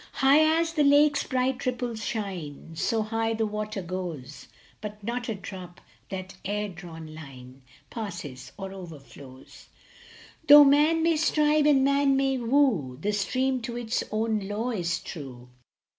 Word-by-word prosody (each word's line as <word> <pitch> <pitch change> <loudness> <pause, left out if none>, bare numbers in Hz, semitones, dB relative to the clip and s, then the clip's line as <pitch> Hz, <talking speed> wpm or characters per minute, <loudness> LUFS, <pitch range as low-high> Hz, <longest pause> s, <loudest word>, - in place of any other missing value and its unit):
High 310 +4 +4
as 330 0 -1
the 305 -2 +2
lake 290 +1 +5
s - - -2
bright 260 0 -1
ripples 245 -3 -3
shine, 175 -9 -5
So 220 +7 0
high 225 +1 -1
the 220 0 0
water 210 -1 -4
goes, 170 -6 -6 0.3
But 210 0 -8
not 240 +3 -3
a 225 - -2
drop 185 -2 -9 0.3
that 190 0 -6
air 210 +1 -2
drawn 165 -3 -10
line 135 -4 -12 0.3
Passes 170 - -7
or 195 0 -6
overflows; 140 -7 -12 0.8
Though 290 0 +11
man 300 +4 +4
may 330 -1 +3
strive 300 -1 +3
and 275 -3 +5
man 280 0 +3
may 270 -1 +1
woo, 230 - +1
The 210 +6 -1
stream 255 +6 0
to 235 +1 -5
its 235 -1 -2
own 215 -2 -1
law 220 +5 -2
is 170 -6 -1
true. 125 -5 -9
215 Hz, 150 wpm, -27 LUFS, 175-265 Hz, 0.8 s, Though